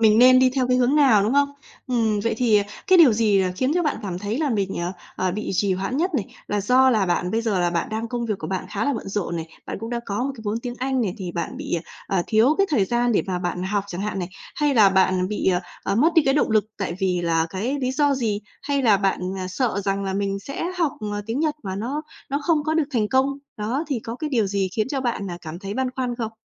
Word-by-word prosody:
mình 220 0 +5
nên 255 +1 +8
đi 255 0 +5
theo 255 -2 +1
cái 250 - +3
hướng 255 +3 +3
nào, 260 -9 +5
đúng 215 +5 +1
không? 285 0 +4 0.4
Ừm, 225 -4 +1
vậy 230 - 0
thì, 230 -4 +4
à, 200 - +2 0.2
cái 370 -1 +6
điều 285 -9 +8
gì 210 -2 +3
là 185 -1 -1
khiến 260 +6 +1
cho 355 - +2
bạn 300 - 0
cảm 180 -3 -4
thấy 210 +6 -3
là 305 -3 0
mình, 200 -4 -1
ờ, 175 +2 -2 0.2
ờ, 185 -1 0
bị 210 +2 -4
trì 200 +1 +2
hoãn 195 +8 -2
nhất 360 +5 +1
này? 215 -8 0 0.2
Là 205 -1 0
do 255 +5 +4
là 210 -5 +2
bạn 180 +1 0
bây 225 - +1
giờ 205 -5 0
là 175 0 +2
bạn 170 -1 -1
đang 220 +1 -3
công 240 -1 -3
việc 215 - 0
của - - -5
bạn 190 -1 -3
khá 205 +4 -1
là 285 - +1
bận 195 - -5
rộn 195 -4 -2
này, 165 0 -4 0.2
bạn - - -4
cũng 225 +1 -5
đã 235 - -2
có 205 +4 -1
một 275 - -1
cái 225 - -11
vốn 210 +2 -1
tiếng 245 -1 -5
Anh 265 0 0
này 195 -3 -2
thì 180 -3 -5
bạn 170 - -4
bị, - - -3 0.3
à, 195 - 0
à, 175 - +2
thiếu 230 +7 +4
cái 395 - +4
thời 220 -10 +3
gian 240 +3 +1
để - - +2
mà 180 -1 -1
bạn 180 0 -3
học 200 +1 -1
chẳng 180 -2 -6
hạn 205 -1 -2
này, 175 - -3 0.3
hay 295 -2 +2
là 210 -4 +7
bạn 185 -1 +2
bị, 210 -2 0
à, 180 - +1 0.2
à, - - 0
mất 310 +9 +3
đi 325 - +6
cái 270 0 +3
động 295 - +2
lực 215 -1 +3
tại 180 -3 -2
vì 180 -2 +1
là 165 -1 +1
cái 230 +10 -2
lý 255 0 0
do 285 0 +2
gì? 215 -5 -1 0.2
Hay 280 -1 0
là 215 -5 +5
bạn, 195 -1 0 0.2
à, 185 0 -4
sợ 200 +1 -1
rằng 195 0 0
là 190 - -2
mình 200 0 -1
sẽ 275 +10 -5
học, 325 -5 +2 0.2
à, 205 - -2
tiếng 235 +6 -2
Nhật 305 -2 +1
mà 190 -1 -4
nó 265 +9 -3 0.3
nó 280 +1 0
không 315 -4 +2
có 315 0 0
được 320 -2 +3
thành 210 -2 +1
công? 265 +1 +3 0.3
Đó, 235 +9 -2
thì 265 -5 -1
có 230 +2 -6
cái 305 0 -4
điều 225 -6 +2
gì 195 -1 0
khiến 215 +2 +1
cho 275 -1 -2
bạn, 230 -7 -2
à, 175 - -6
cảm 165 +1 -7
thấy 200 +1 -6
băn 260 -1 -1
khoăn 250 -2 -1
không? 225 -2 -3
220 Hz, 290 wpm, -23 LUFS, 195-260 Hz, 0.4 s, nên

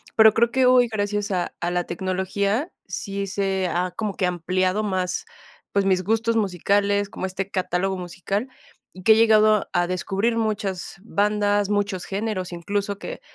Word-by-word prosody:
Pero 220 -1 +7
creo 235 +1 +3
que 260 +1 +2
hoy, 250 -1 +6
gracias 205 -1 -1
a 180 -3 -1
a 175 - 0
la 175 0 0
tecnología, 190 - -1 0.2
sí 195 +1 -4
se 190 -1 -1
ha 180 +1 -1
como 210 -3 -3
que 190 - 0
ampliado 185 +3 0
más, 185 -3 -2 0.5
pues, 200 -1 +1
mis 185 -1 +2
gustos 225 +3 +1
musicales, 200 +1 +1
como 190 - -4
este 195 +1 -5
catálogo 185 +1 -1
musical, 185 +6 -3 0.5
y 185 - -12
que 220 - +5
he - - +9
llegado 215 -2 +4
a 175 0 +2
descubrir 195 +5 -1
muchas 205 -5 -2
bandas, 205 -1 +1
muchos 200 -3 -1
géneros, 195 -2 -3
incluso 200 +3 -2
que - - -7
200 Hz, 160 wpm, -23 LUFS, 185-215 Hz, 0.5 s, he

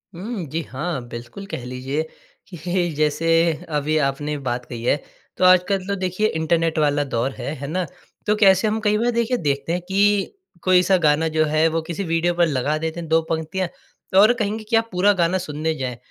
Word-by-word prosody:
हुँ। 195 +1 -5
जी, 155 +3 -3
हाँ। 150 +1 -3
बिल्कुल, 120 +12 -8
कह 125 - -4
लीजिए 130 +4 -3 0.5
कि 175 0 -2
जैसे 155 +2 +1 0.5
अभी 150 +2 +1
आपने 145 +2 -3
एक 145 -2 -5
बात 125 -1 -2
कही 115 -2 -7
है 125 - +3 0.4
तो - - 0
आजकल 185 +1 +4
तो 200 - 0
देखिए 185 +2 0
इंटरनेट 165 0 +1
वाला 145 -1 +2
दौर 130 -1 -1
है, 145 - -5
है 140 0 -6
ना। 180 +4 -1 0.4
तो 210 - +3
कैसे 195 -1 +5
हम 215 +1 0
कई 210 -1 +2
बार 235 +3 +1
देखिए 235 +1 0
देखते 145 -1 -1
हैं 180 - -1
कि 200 +1 +2 0.3
कोई 185 -1 +5
सा 190 0 +4
गाना 150 +2 +3
जो 155 0 +4
है 155 +1 +2
वो 165 - +1
किसी 170 +4 -4
वीडियो 165 0 +1
पर 170 0 +3
लगा 145 +1 0
देते 160 +2 -4
हैं 165 - -6
2 165 +1 +4
पंक्तियाँ 165 +3 -2 0.5
और 215 +4 +7
कहेंगे 215 +1 -2
कि 235 - +2
आप 225 0 +2
पूरा 190 +3 +3
गाना 175 +3 +1
सुनने 160 -2 -2
जाएँ, 130 -4 -4
165 Hz, 205 wpm, -22 LUFS, 150-190 Hz, 0.5 s, और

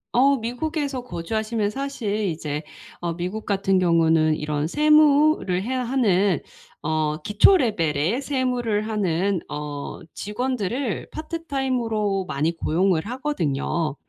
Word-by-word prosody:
어 275 +3 +5
미국에서 275 +3 -3
거주하시면 215 +1 -2
사실 270 -5 -3
이제 150 -3 -3 0.4
어 170 -1 -1
미국 185 +5 -4
같은 195 -1 +1
경우는 165 -3 +3
이런 150 -1 -2
세무를 300 - +4
해야 255 +3 -1
하는 205 - +2 0.4
어 155 -1 0
기초 210 - +5
레벨의 175 - 0
세무를 250 -6 -1
하는 195 -3 0
어 145 -1 -5
직원들을 245 +1 -2
파트타임으로 255 - -2
많이 155 +3 -1
고용을 170 +1 +1
하거든요. 170 - -1
210 Hz, 265 characters per minute, -23 LUFS, 165-255 Hz, 0.4 s, 어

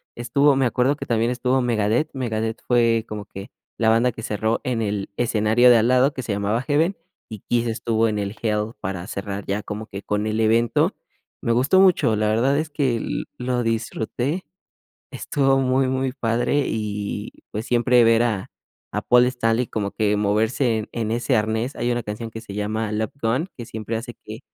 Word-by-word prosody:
estuvo, 140 +4 +3
me 135 - +2
acuerdo 125 +3 +1
que - - -6
también 115 0 +1
estuvo 125 +1 +1
Megadeth. 120 +4 +1
Megadeth 115 -3 -3
fue 115 -2 +3
como 105 -1 -6
que 100 0 -9 0.3
la 115 - +1
banda 115 +3 +4
que 115 - -9
cerró 110 +2 -1
en 120 -3 -1
el 100 -2 -2
escenario 115 +1 +3
de 120 - +7
al 115 +1 +3
lado, 130 +3 +4
que 130 - -4
se 110 -4 -3
llamaba 100 +3 0
Heaven, 160 +6 +2 0.3
y 110 - -7
Kiss 120 0 +1
estuvo 115 0 0
en 105 -1 -2
el 100 +1 -3
Hell 105 0 -1
para 95 -1 -4
cerrar 100 0 -5
ya 100 +2 -2
como 105 +1 -6
que 100 - -7
con 105 +1 -2
el 110 0 -1
evento. 115 +1 +2 0.5
Me 115 - +1
gustó 130 +10 +3
mucho, 160 - +4
la 105 0 +1
verdad 120 +6 +2
es 155 0 -3
que 130 -7 0 0.4
lo 125 0 -1
disfruté. 115 - -2 0.7
Estuvo 135 -3 +1
muy 130 0 +2
muy 130 0 -1
padre, 125 +3 0
y 105 -1 -3 0.2
pues, 110 +2 -4
siempre 120 0 +4
ver 115 0 +4
a 110 -5 -2 0.4
a - - -2
Paul 125 0 +5
Stanley 120 -1 0
como 100 -2 -3
que 105 -1 +1
moverse 110 +4 +1
en 110 - -7
en 110 -2 -2
ese 120 +3 +1
arnés. 110 +4 -1
Hay 120 - 0
una 120 0 -2
canción 105 +2 -5
que 115 0 -8
se 105 -4 -10
llama: 105 +1 -2
"Love 110 0 -2
Gun", 120 +9 0
que 120 - -7
siempre 110 0 -5
hace 120 +2 -5
que 110 +1 -7
115 Hz, 195 wpm, -22 LUFS, 110-125 Hz, 0.7 s, de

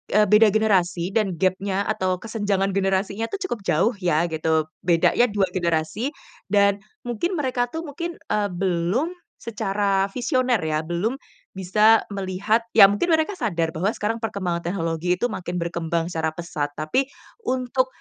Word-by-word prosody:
eee, 210 - +6
beda 215 +1 +7
generasi 195 -4 +1
dan 205 -5 0
gapnya 190 +2 0
atau 185 -3 0
kesenjangan 205 -3 -1
generasinya 195 +3 0
tuh 400 - -5
cukup 235 - -2
jauh 195 +10 +2
ya 175 -3 +2
gitu. 160 0 +1 0.2
Bedanya 180 +7 +3
dua 200 -4 0
generasi 175 - -1 0.4
dan 200 0 +3 0.2
mungkin 245 - -2
mereka 255 -5 0
tuh 325 +6 -6
mungkin, 335 +3 -5 0.2
eee, 210 -1 +1
belum 185 - -1 0.3
secara 200 -3 0
visioner 255 -1 +1
ya, 155 -1 -1
belum 175 +9 -1 0.4
bisa 210 +4 +4
melihat. 195 +3 0 0.2
Ya 200 -3 +9
mungkin 205 +13 0
mereka 325 +4 +1
sadar 165 -8 0
bahwa 170 +5 -1
sekarang 225 +2 -2
perkembangan 190 -6 -2
teknologi 170 -1 -1
itu 240 +5 -1
makin 180 -3 -5
berkembang 170 0 -2
secara 160 -1 -2
pesat. 155 -4 -3
Tapi, 255 - 0 0.4
untuk, 255 0 0
195 Hz, 145 wpm, -23 LUFS, 175-225 Hz, 0.4 s, Ya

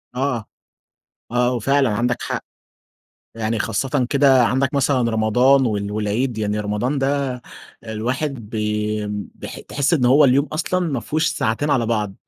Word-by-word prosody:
آه. 125 -4 -1 0.9
آه، 125 +1 +2
وفعلًا 135 +2 +2
عندك 120 +3 -1
حق. - - -4 0.9
يعني 115 0 -2
خاصةً 130 +5 -1
كده 135 -3 +5
عندك 130 +4 0
مثلًا 130 -4 +2
رمضان 125 +5 +3
و 105 -2 -2
والعيد. 110 +3 -1
يعني 105 0 -1
رمضان 105 +7 -1
ده 135 -2 -1 0.4
الواحد 120 +2 -3
بي 105 -1 -2 0.3
بح - - -8
تحس 145 +4 0
إن 135 -6 +1
هو 140 +4 +6
اليوم 135 +2 +4
أصلًا 165 +4 -1
ما 135 -5 -2
فيهوش 155 +5 -1
ساعتين 115 +7 -1
على 120 -5 +2
بعض. 105 -4 -1
125 Hz, 140 wpm, -21 LUFS, 110-140 Hz, 0.9 s, هو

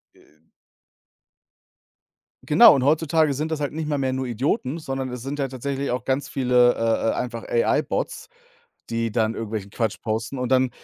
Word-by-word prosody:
Äh 75 +1 -26 2.0
Genau, - - +8
und 135 - 0
heutzutage 155 +1 +2
sind 155 +4 -3
das 155 -2 -2
halt 145 - -1
nicht 155 0 -4
mal 150 -1 0
mehr 135 -1 0
nur 130 0 -2
Idioten, 130 - -1
sondern 135 -4 -4
es 125 -1 -6
sind 140 +2 -5
ja 135 - 0
tatsächlich 135 +1 -3
auch 125 0 -2
ganz 135 +2 -1
viele, 125 -2 +3
äh, 115 0 +1
äh, - - -2
einfach 115 -2 -4
AI-Bots, 115 - 0 0.6
die 115 -1 -1
dann 110 0 +1
irgendwelchen 110 -3 -5
Quatsch 110 0 -2
posten. 110 +4 -3
Und 125 -1 -3
dann 130 -1 +3
130 Hz, 170 wpm, -23 LUFS, 115-140 Hz, 2.0 s, Genau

